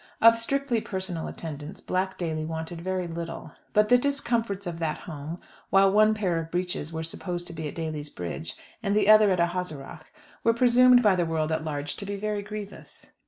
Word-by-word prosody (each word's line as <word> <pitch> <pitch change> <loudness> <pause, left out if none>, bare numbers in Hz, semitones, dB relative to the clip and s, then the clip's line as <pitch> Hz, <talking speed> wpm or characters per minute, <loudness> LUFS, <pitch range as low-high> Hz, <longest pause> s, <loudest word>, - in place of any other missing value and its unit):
Of 230 0 +7
strictly 265 -1 0
personal 185 -5 -3
attendance 155 -1 -7
Black 190 +1 -2
Daly 160 -3 -2
wanted 160 +1 -5
very 185 0 -2
little; 165 -1 -6 0.2
but 210 0 +3
the 245 - +6
discomforts 235 -7 0
of 170 -2 -5
that 160 -2 -2
home, 155 +1 -7 0.3
while 195 0 +5
one 215 +1 +5
pair 185 -6 0
of 165 0 -6
breeches 175 -3 -2
were 160 0 -4
supposed 175 +2 -3
to 175 - -7
be 160 -2 -4
at - - -7
Daly's 155 -3 -4
Bridge, 90 - -5 0.3
and 200 -2 0
the 210 -2 +3
others 215 -1 +8
at 180 - -1
Ahaseragh, 165 -4 -5 0.4
were 230 0 +3
presumed 250 +1 +6
by 205 -3 +5
the 175 -2 0
world 160 -1 -1
at 160 0 -1
large 145 -2 -3
to 200 - -6
be 205 - -3
very 210 0 -2
grievous. 210 0 -9
180 Hz, 195 wpm, -27 LUFS, 160-210 Hz, 0.4 s, others